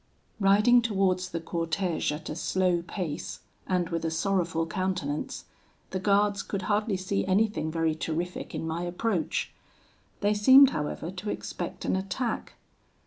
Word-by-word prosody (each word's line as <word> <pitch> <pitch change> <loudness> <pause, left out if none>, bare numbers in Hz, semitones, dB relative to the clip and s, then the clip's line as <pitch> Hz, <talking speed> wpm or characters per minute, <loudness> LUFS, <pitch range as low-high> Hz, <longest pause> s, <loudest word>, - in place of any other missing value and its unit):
"Riding 210 +5 +5
towards 190 -4 +1
the 170 - -3
cortege 165 0 -1
at 150 +2 -6
a 155 - -4
slow 180 0 +1
pace, 170 -3 -5 0.3
and 180 -2 0
with 165 -1 -2
a 165 - 0
sorrowful 165 -1 0
countenance, 170 -5 -3 0.5
the 185 - -2
guards 200 +1 +2
could 200 -1 -4
hardly 210 -1 +1
see 190 +2 -1
anything 190 -4 +1
very 165 -1 +1
terrific 165 +3 -4
in - - -3
my 160 +1 -2
approach. 175 +1 -1 0.7
They 205 0 +3
seemed, 260 +6 +8
however, 155 +1 -3
to 190 +3 -6
expect - - -5
an - - +1
attack. 195 +6 -3
185 Hz, 140 wpm, -28 LUFS, 165-205 Hz, 0.7 s, seemed